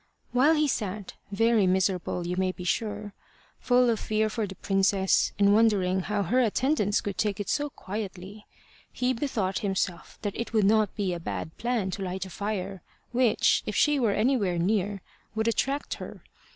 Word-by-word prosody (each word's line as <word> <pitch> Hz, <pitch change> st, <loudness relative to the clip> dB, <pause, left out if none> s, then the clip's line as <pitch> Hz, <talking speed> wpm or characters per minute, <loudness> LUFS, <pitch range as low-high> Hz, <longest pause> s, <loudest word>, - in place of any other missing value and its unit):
While 275 Hz, +6 st, +4 dB
he 305 Hz, -1 st, +2 dB
sat 210 Hz, -6 st, -3 dB, 0.2 s
very 225 Hz, -1 st, +3 dB
miserable, 185 Hz, -1 st, 0 dB
you 175 Hz, +1 st, -2 dB
may 185 Hz, 0 st, +1 dB
be 180 Hz, -, -9 dB
sure 205 Hz, +2 st, -2 dB, 0.5 s
full 250 Hz, 0 st, +3 dB
of 230 Hz, -2 st, +1 dB
fear 215 Hz, 0 st, 0 dB
for 220 Hz, -2 st, -2 dB
the 190 Hz, -, -9 dB
princess, 195 Hz, 0 st, +2 dB
and 200 Hz, 0 st, +5 dB
wondering 200 Hz, -4 st, +3 dB
how 205 Hz, +2 st, -1 dB
her 245 Hz, +8 st, +1 dB
attendants 235 Hz, -2 st, +1 dB
could 200 Hz, -2 st, -5 dB
take 210 Hz, -2 st, 0 dB
it 205 Hz, -, -3 dB
so 290 Hz, 0 st, 0 dB
quietly, 200 Hz, -2 st, -7 dB, 0.4 s
he 250 Hz, +1 st, 0 dB
bethought 225 Hz, -7 st, -1 dB
himself 190 Hz, -4 st, -2 dB
that 205 Hz, -2 st, -2 dB
it 235 Hz, 0 st, -4 dB
would 215 Hz, -3 st, +3 dB
not 215 Hz, 0 st, +3 dB
be 195 Hz, -4 st, -1 dB
a 175 Hz, -, -4 dB
bad 105 Hz, -, -5 dB
plan 235 Hz, -5 st, -1 dB
to 195 Hz, -, -5 dB
light 190 Hz, 0 st, -3 dB
a 190 Hz, -, -10 dB
fire, 195 Hz, -2 st, -4 dB, 0.3 s
which, 245 Hz, -3 st, +3 dB
if 215 Hz, -, -3 dB
she 295 Hz, -1 st, +3 dB
were 225 Hz, -5 st, +2 dB
anywhere 210 Hz, -6 st, +1 dB
near, 200 Hz, +2 st, 0 dB, 0.3 s
would 220 Hz, +1 st, 0 dB
attract 275 Hz, +5 st, 0 dB
her. -, -, -9 dB
205 Hz, 180 wpm, -27 LUFS, 190-230 Hz, 0.5 s, and